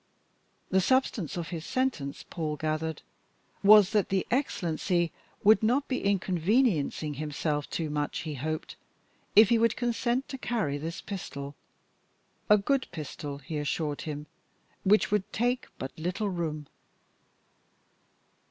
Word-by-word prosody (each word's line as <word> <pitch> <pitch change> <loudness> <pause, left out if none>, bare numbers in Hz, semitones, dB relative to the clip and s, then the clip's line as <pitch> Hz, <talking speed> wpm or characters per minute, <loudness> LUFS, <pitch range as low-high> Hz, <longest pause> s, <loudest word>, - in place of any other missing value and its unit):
The 190 0 +4
substance 225 - +1
of 170 -2 -4
his 165 -3 -5
sentence, 205 - -2
Paul 155 -3 -3
gathered, 155 +1 -2 0.6
was 205 -1 +8
that 210 -3 +2
the 190 -1 +1
Excellency 175 - 0 0.3
would 215 +2 +6
not 250 +6 +2
be 255 - -2
inconveniencing 185 - +1
himself 150 0 -2
too 165 - -2
much, 145 0 -2
he 155 -2 -4
hoped, 155 +3 -4 0.6
if 215 0 +8
he 235 - +4
would 230 0 +3
consent 240 +1 0
to 270 - -6
carry 205 - -1
this 165 +3 -5
pistol. 140 -8 -6 1.0
A 210 - +8
very 200 - -5
good 275 +3 +1
pistol, 145 -3 -6
he 150 +3 -5
assured 150 0 -2
him, 150 -1 -5 0.6
which 205 +2 +4
would 210 -2 0
take 245 +3 0
but 130 - -5
little 185 +6 -1
room. 155 -4 -3
175 Hz, 135 wpm, -29 LUFS, 155-220 Hz, 1.0 s, was